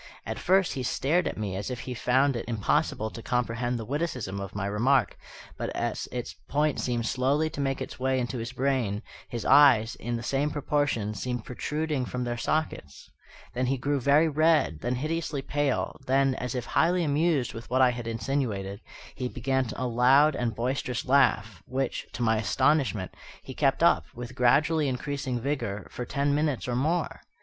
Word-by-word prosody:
At - - -4
first 190 0 +3
he 135 - -3
stared 150 +7 +1
at - - -4
me 100 -3 -3
as 100 +1 -4
if 125 -2 -4
he 125 - -5
found 130 +3 +2
it 115 - -4
impossible 110 -1 0
to 115 - -8
comprehend 120 0 -1
the 115 - -5
witticism 130 - -3
of 100 -1 -7
my 100 -1 -2
remark; 120 +7 +2 0.4
but - - -2
as - - -2
its - - -4 0.2
point 150 0 +1
seemed 120 -2 -1
slowly 140 +7 +1
to 145 - -4
make 135 -1 -1
its - - -10
way 130 0 +1
into 125 0 -3
his 115 +2 -4
brain, 130 -6 -1 0.3
his 120 -2 -5
eyes, 120 -6 +6
in 120 0 -4
the 115 - -6
same 140 +4 0
proportion, 145 -8 -1
seemed 120 +2 -4
protruding 150 +1 -2
from 125 0 -3
their 120 -1 -2
sockets. 120 - -3 0.4
Then 125 +1 -1
he 135 +1 +1
grew 140 +3 0
very 145 +5 +4
red, 155 - +2
then 120 +7 -1
hideously 155 0 -2
pale, 145 -1 -1
then, 135 +1 +3
as 125 0 -4
if 125 - -3
highly 175 +2 +2
amused 150 -3 +1
with 115 +1 -9
what 130 +1 +3
I 125 - +5
had 120 -1 -6
insinuated, 115 -5 -2 0.3
he 125 - -3
began 130 -1 -1
a 130 - -3
loud 130 +5 +4
and 120 -3 -2
boisterous 125 0 -2
laugh, 110 -8 +2
which, 130 0 -2
to 120 - -3
my 110 -1 +3
astonishment, 125 -2 +1 0.3
he - - -8
kept - - +1
up, - - +4
with 120 +1 -7
gradually 150 +5 +3
increasing 130 -1 -2
vigour, 115 -7 -3
for 125 - -5
ten 140 +3 0
minutes 145 -4 0
or 120 - -1
more. 160 +6 -1
130 Hz, 185 wpm, -27 LUFS, 120-145 Hz, 0.4 s, eyes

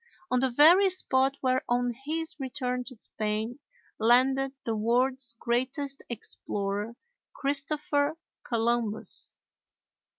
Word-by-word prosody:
on 250 - +3
the 265 +1 +2
very 335 +10 +6
spot 270 -6 +2
where 255 -1 +2
on 245 0 +1
his 325 +2 -2
return 250 -1 -2
to 255 +1 -10
Spain 220 +2 -3 0.4
landed 260 +4 +3
the 225 - -1
world's 245 +3 +1
greatest 260 +3 -1
explorer 205 -1 -3 0.4
Christopher 290 +2 0 0.3
Columbus. 230 -2 -2
255 Hz, 100 wpm, -28 LUFS, 235-275 Hz, 0.4 s, very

